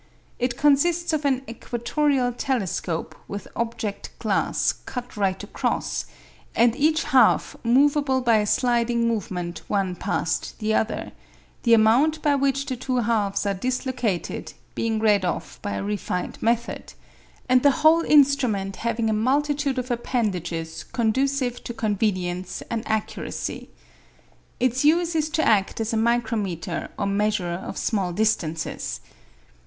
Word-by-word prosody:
It 250 0 -1
consists 320 +4 +3
of 305 -1 -1
an 265 -2 +1
equatorial 245 +3 0
telescope 195 -10 -2
with 200 0 -6
object 225 -3 -3
glass - - +1
cut 245 -1 -6
right 195 -2 0
across, 205 - -2 0.5
and 235 0 +4
each 310 +3 +2
half - - +3
movable 270 +2 +3
by 235 -3 +3
a 210 -1 +1
sliding 235 0 +2
movement 180 -6 -3
one 195 -3 0
past - - -2
the 215 -1 -1
other, 220 - -1 0.5
the 235 -2 +5
amount 250 +9 +4
by 295 - +3
which 275 0 +1
the 260 - -3
two 255 +1 -2
halves 210 -4 0
are 200 - +1
dislocated 250 -2 -2 0.2
being 225 -1 -1
read 210 -3 +3
off 175 - -3
by 205 - -3
a - - -3
refined 200 -3 -3
method, 235 +1 -1 0.5
and 255 0 +5
the 285 - +6 0.2
whole 325 +1 +7
instrument 265 - +3
having 230 -1 -1
a 220 - +1
multitude 280 +4 +1
of 250 0 -2
appendages 175 -10 -2
conducive 255 +2 0
to 240 - -6
convenience 185 -4 -1
and 230 -1 -1
accuracy. 220 -1 -3 0.9
Its 255 +1 +1
use 335 +3 +3
is 310 -1 0
to 315 0 0
act 205 -1 +2
as 225 0 -1
a - - +1
micrometer 220 -6 -1
or 200 - -1
measurer 200 -3 0
of 175 - -6
small 195 -5 0
distances. 170 - -1
235 Hz, 135 wpm, -24 LUFS, 205-265 Hz, 0.9 s, whole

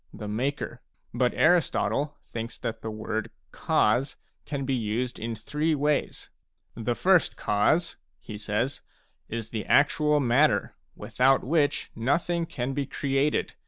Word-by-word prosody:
— - - -36
the 105 - -4
ma 115 +6 0
ker; 145 - -7 0.3
but 125 +1 +2
Aristotle 155 -3 +2
thin 115 0 -5
ks - - -13
that 115 - -5
the 110 - -4
word 110 0 -3
u - - -44
cause 125 +6 +1
" - - -47
can 140 -2 -3
be 135 - 0
used 120 +1 -2
in 115 +1 -3
three 150 +8 -1
ways: 145 0 -1 0.2
" - - -54 0.2
The 120 +1 -2
first 185 +1 +3
causeT^ 130 +12 +1 0.2
he 110 - -10
s^s/ 105 +5 -2 0.5
?r 115 - -3
isth"e 110 -1 -4
actual 150 +1 +3
matter, 120 -4 +2 0.2
without 130 +1 +2
which 145 +1 +1
nothing 165 +8 0
can 130 -2 -3
be 140 -1 -2
created. 140 +1 0
130 Hz, 160 wpm, -27 LUFS, 115-150 Hz, 0.5 s, first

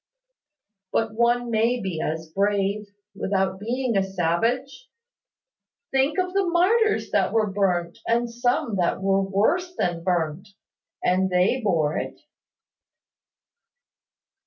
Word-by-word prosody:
"But 225 -1 0
one 240 +1 +1
may 230 +3 +2
be 185 -7 -3
as 160 +1 -3
brave, 200 +2 0 0.3
without 190 -1 -1
being 240 +2 -1
a 195 - +4
savage. 210 - -1 1.0
Think 270 +4 +1
of 365 -1 0
the 395 0 +2
martyrs 410 +6 +2
that - - +2
were 215 -3 +1
burnt, 180 -2 0
and 235 +1 +2
some 240 -2 -1
that 175 0 +1
were 195 0 +2
worse 285 - 0
than 170 - -1
burnt! 175 0 -1 0.6
And 190 +1 +2
they 185 +8 +2
bore 160 -7 +1
it." - - -6
205 Hz, 115 wpm, -24 LUFS, 185-245 Hz, 1.0 s, a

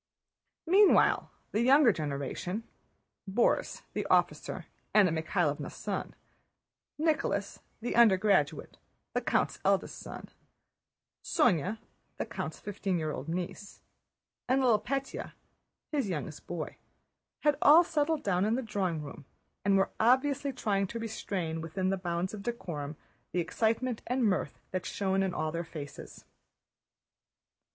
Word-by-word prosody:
Meanwhile 390 +4 +5 0.2
the 215 - +1
younger 265 0 +6
generation: 155 - -3 0.7
Borís, 235 +5 +1
the - - -2
officer, - - +1 0.3
Anna 200 -5 +6
Mikháylovna's 160 -2 -1
son; - - -4 0.8
Nicholas, 310 0 0 0.2
the 240 - -2
undergraduate, 210 -3 +3 0.3
the - - +1
count's - - 0
eldest - - +1
son; - - -9 0.9
Sónya, 195 - +2 0.4
the - - -2
count's - - -5
fifteen 195 -2 -2
year 155 -2 -1
old 145 +1 -6
niece, 180 +3 -5 0.7
and 260 +1 +4
little 235 -4 +5
Pétya, 275 +4 -3 0.6
his 280 -9 0
youngest 150 -3 -5
boy, 170 -3 -5 0.6
had 295 -1 +3
all 315 +4 +8
settled 315 -1 0
down 185 -2 +1
in 215 +3 +2
the 260 - -2
drawing 185 -8 -1
room 140 -1 -9 0.4
and 195 0 +4
were 195 - +2
obviously 275 +4 +3
trying 200 -6 0
to 230 - -6
restrain 190 -7 -3
within 185 +4 -2
the - - +2
bounds 175 +1 -2
of 210 - -6
decorum 160 -10 -4 0.4
the 180 - +1
excitement 225 +7 0
and 250 0 +1
mirth 195 -4 0
that 185 -1 -2
shone 195 -1 0
in 190 -1 +1
all 155 -2 -2
their 170 +1 -2
faces. 150 -4 -9
200 Hz, 130 wpm, -30 LUFS, 170-245 Hz, 0.9 s, all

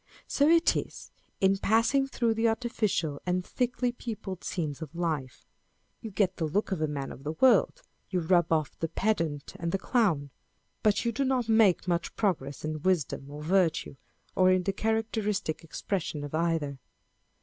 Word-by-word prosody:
So 285 - +2
it 335 +1 +5
is - - -5 0.3
in 195 0 +3
passing 230 +7 +3
through 235 -4 0
the 225 +1 +1
artificial 215 -10 -1
and 180 0 -1
thickly 250 0 -1
peopled 215 -6 -6
scenes 155 -5 -3
of 160 0 -8
life. 155 -7 -3 0.6
You 225 - -6
get 190 -2 0
the 160 - -1
look 200 +8 -1
of 185 -5 -1
a 155 - +2
man 140 -2 -4
of 135 - -11
the 150 +2 -3
wrorld: 265 - +4 0.3
you 185 - 0
rub 175 0 +3
off 155 -3 +1
the 165 - -1
pedant 165 -6 -1
and 170 0 -2
the 195 - +1
clown; 185 - +1 0.5
but 215 +2 +2
you 235 - +2
do 275 +5 -1
not 260 -3 +1
make 220 -5 +4
much 170 -1 -1
progress 150 -10 -1
in 155 -1 -3
wisdom 160 -6 0
or 150 +1 -8
virtue, 170 -4 +1 0.4
or 185 0 +5
in 185 0 +3
the 195 +2 -1
characteristic 215 -6 -1
expression 165 -2 -3
of 145 - -7
either. 160 -4 0
185 Hz, 170 wpm, -29 LUFS, 155-220 Hz, 0.6 s, it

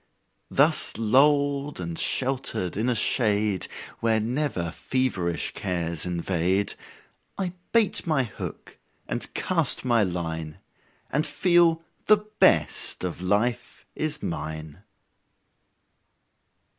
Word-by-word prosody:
Thus - - +3
lulled 140 +4 +2
and 85 -2 -5
sheltered 130 -6 -1
in 110 +5 0
a 125 - +1
shade 105 -4 +1 0.3
Where 115 -1 +2
never 115 - -2
feverish 100 -11 -2
cares 85 -2 -3
invade, 90 +2 -1 0.6
I 185 -3 -3 0.2
bait 225 -6 +4
my 155 -5 +2
hook 115 - -8 0.3
and - - -4
cast - - +4
my 120 -3 +3
line, 80 -4 -3 0.5
And 150 +3 0
feel 170 -2 +3 0.2
the 215 - +7 0.2
best - - +3
of 90 -1 -4
life 110 +6 -1
is 155 -1 -4
mine. 80 +1 -6
110 Hz, 100 wpm, -25 LUFS, 90-140 Hz, 0.6 s, the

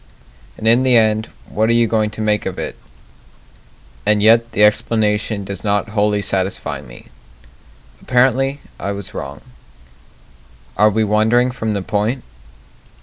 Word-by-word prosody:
And 110 - -3
in 115 +3 +5
the 130 -2 +4
end, 110 0 +2 0.2
what 110 +1 0
are - - +4
you 120 0 +4
going 110 -1 0
to 105 +1 -7
make 105 -1 0
of - - -5
it? - - -4 1.3
And 105 0 +2
yet 115 +2 +4
the 105 - +3
explanation 105 -1 +1
does 100 0 -6
not 105 +1 0
wholly 105 -1 0
satisfy 95 -1 -2
me - - -14 0.9
Apparently 135 +2 +1 0.2
I 100 - -3
was 100 0 -8
wrong 70 +1 -7 1.3
Are 105 +3 +4
we 110 +1 0
wandering 110 +4 +2
from 110 -4 -3
the 100 - -3
point? 110 +5 -1
110 Hz, 145 wpm, -18 LUFS, 105-115 Hz, 1.3 s, in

